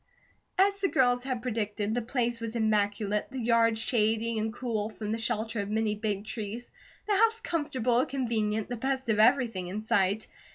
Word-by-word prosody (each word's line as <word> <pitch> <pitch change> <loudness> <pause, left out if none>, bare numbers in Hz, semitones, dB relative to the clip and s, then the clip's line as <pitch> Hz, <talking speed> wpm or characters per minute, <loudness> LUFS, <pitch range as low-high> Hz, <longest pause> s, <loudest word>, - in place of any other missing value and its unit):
As 395 +1 +3
the 390 - +3
girls 245 -6 +3
had 255 -2 -3
predicted, 215 -3 -2
the 245 - 0
place 240 -1 -1
was 230 0 -4
immaculate, 210 -1 +1
the 265 - -7
yard 230 -2 +3
shady 225 -1 +1
and 220 +1 -1
cool 220 -3 -2
from 215 -1 -5
the 225 - -1
shelter 225 0 -1
of 200 0 -3
many 220 0 +1
big 210 -1 -3
trees, 220 +2 -5 0.4
the 420 - +2
house 450 +2 +4
comfortable, 255 - 0
convenient, 220 -5 -1
the 245 - -4
best 265 +1 -2
of 215 -1 +2
everything 230 -6 +3
in 205 +4 -4
sight. 200 0 +1
225 Hz, 175 wpm, -29 LUFS, 215-245 Hz, 0.4 s, house